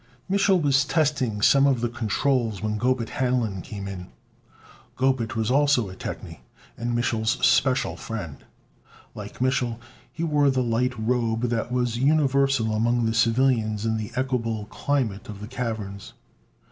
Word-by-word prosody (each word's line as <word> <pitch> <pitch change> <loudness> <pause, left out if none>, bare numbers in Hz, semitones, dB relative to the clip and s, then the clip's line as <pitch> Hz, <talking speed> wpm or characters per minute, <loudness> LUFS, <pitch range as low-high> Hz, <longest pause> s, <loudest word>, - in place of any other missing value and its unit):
Mich'l 195 -1 +3
was 140 -3 +3
testing 140 -9 0
some 140 +3 +5
of 135 -3 +2
the 120 - +1
controls 115 -1 0
when 105 0 -2
Gobet 125 -1 0
Hanlon 120 -7 -1
came 100 0 -7
in. 90 -2 -7 0.9
Gobet 130 -4 0
was 110 +1 0
also 140 -6 +3
a - - -10
technie, - - -7 0.4
and 120 0 -2
Mich'l's 115 +1 0
special 130 -1 +2
friend. 90 - -6 0.8
Like - - -9
Mich'l, 125 -3 0 0.3
he 165 - -5
wore 150 -3 +3
the 130 -1 +1
light 125 +1 0
robe 115 +1 0
that 115 +1 -2
was 125 -2 0
universal 135 -5 +2
among 120 +2 +1
the 110 - 0
civilians 115 -2 +2
in 110 0 0
the 110 -1 -5
equable 115 -5 -1
climate 120 -10 -2
of 105 -2 -7
the 105 - -7
caverns. 110 -5 -5
120 Hz, 145 wpm, -25 LUFS, 110-130 Hz, 0.9 s, some